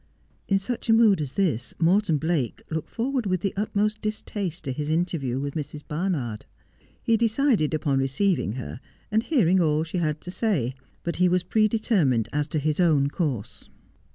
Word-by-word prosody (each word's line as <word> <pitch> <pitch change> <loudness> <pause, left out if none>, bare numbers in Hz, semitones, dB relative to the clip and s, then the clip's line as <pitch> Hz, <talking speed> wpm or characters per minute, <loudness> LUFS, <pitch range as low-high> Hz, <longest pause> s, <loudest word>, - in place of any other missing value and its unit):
' - - -38
In 195 - +3
such 235 +4 -4
a - - +7
mood 220 -6 +5
as 140 -3 -4
this 150 - 0
Morton 175 0 +3
Blake 155 -6 -1
looked 160 -1 -3
forward 250 -1 -1
with 185 -2 0
the 195 - -1
utmost 210 +1 0
distaste 205 -5 -4
to 135 - -3
his 145 +3 -3
interview 155 -6 0
with 140 0 -3
Mrs. 150 -1 -5
Barnard. 150 - -2 0.6
He 230 - +3
decided 230 - +2
upon 140 -3 +1
receiving 135 - +1
her, 125 0 -6 0.3
and 220 +1 +3
hearing 195 - +3
all 155 -1 +2
she 165 +3 -3
had 155 -2 -1
to 180 - -7
say; 180 - 0 0.3
but 170 - -3
he 180 0 +4
was 180 0 +2
pre 215 -1 +3
determined 190 - +1
as 150 0 0
to 155 - -2
his 150 +2 0
own 150 -6 +4
course. 140 - -3
170 Hz, 180 wpm, -25 LUFS, 145-205 Hz, 0.6 s, a